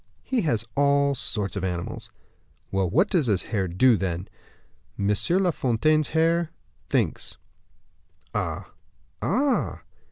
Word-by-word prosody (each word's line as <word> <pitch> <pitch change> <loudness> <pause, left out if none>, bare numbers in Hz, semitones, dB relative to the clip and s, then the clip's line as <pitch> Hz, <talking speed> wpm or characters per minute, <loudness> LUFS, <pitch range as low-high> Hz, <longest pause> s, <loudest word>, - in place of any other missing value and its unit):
"He 255 -3 0
has 115 - +1
all 140 0 +3
sorts 105 -7 -2
of 100 - -3
animals." 90 -2 -3 0.6
"Well, 95 -2 +1
what 165 - +3
does 170 -11 +1
his 100 -5 +2
hare 100 -5 -1
do, 110 +7 +4
then?" 95 0 -2 0.7
"M. 100 +1 +2 0.3
La 180 - +3
Fontaine's 155 +4 +2
hare 165 +1 +2 0.4
thinks." - - 0 1.0
"Ah, - - -3 0.5
ah!" 275 -1 +1
125 Hz, 120 wpm, -25 LUFS, 95-160 Hz, 1.0 s, do